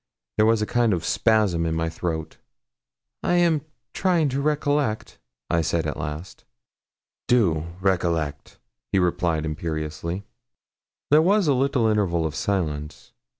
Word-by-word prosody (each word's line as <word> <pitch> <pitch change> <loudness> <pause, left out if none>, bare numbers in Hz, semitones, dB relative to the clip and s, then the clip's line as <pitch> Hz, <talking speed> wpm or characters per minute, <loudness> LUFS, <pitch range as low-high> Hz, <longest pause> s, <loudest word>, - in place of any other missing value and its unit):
There 110 0 +5
was 110 -1 +3
a - - +1
kind 120 -1 +2
of 85 -2 -2
spasm 105 -7 +2
in 80 -1 -1
my 80 0 0
throat. 80 -1 -4 0.8
'I - - 0
am 170 -4 +3 0.3
trying 175 -5 +2
to 135 +2 -1
recollect,' 145 -5 0 0.3
I 85 -1 +1
said 80 - 0
at - - -2
last. 75 +5 -6 0.8
'Do 85 -10 +2
recollect,' 85 -6 -1 0.3
he - - +2
replied 85 -3 +1
imperiously. 80 +3 -4 0.9
There 150 +1 +7
was 195 +2 +3
a 145 - +4
little 130 -2 +1
interval 95 -7 +1
of 80 - -2
silence. 75 -4 -3
95 Hz, 135 wpm, -24 LUFS, 80-125 Hz, 0.9 s, There